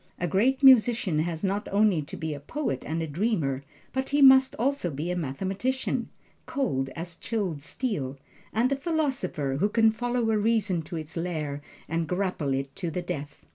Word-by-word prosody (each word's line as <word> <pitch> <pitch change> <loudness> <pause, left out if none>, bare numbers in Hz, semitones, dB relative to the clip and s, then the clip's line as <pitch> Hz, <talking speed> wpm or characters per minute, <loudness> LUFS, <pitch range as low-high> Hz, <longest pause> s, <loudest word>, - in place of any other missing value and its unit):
A 175 - -1
Great 255 - +2
Musician 235 - +6
has 165 +1 -2
not 200 +2 -1
only 200 -5 +3
to 140 - -8
be 160 -1 -3
a 145 - -6
poet 145 - -3
and 165 +2 -1
a - - -3
dreamer, 150 - 0 0.3
but 265 0 -1
he 285 - +2
must 265 -1 +7
also 265 -5 0
be 155 +4 -3
a - - -1
mathematician, 190 - -2 0.4
cold 135 - -1
as 170 +1 -6
chilled 185 -7 -3
steel, 145 - -3 0.3
and 240 +5 +1
a - - +3
philosopher 265 - -1
who 205 - +2
can 225 0 +4
follow 240 0 0
a 215 - +2
reason 210 -5 +1
to 165 +3 -8
its 155 0 -6
lair 155 -4 -3 0.3
and 165 0 -1
grapple 180 -6 -1
it 135 0 -4
to 175 - -2
the 175 +2 -3
death. 150 -4 -6
180 Hz, 180 wpm, -27 LUFS, 155-235 Hz, 0.4 s, must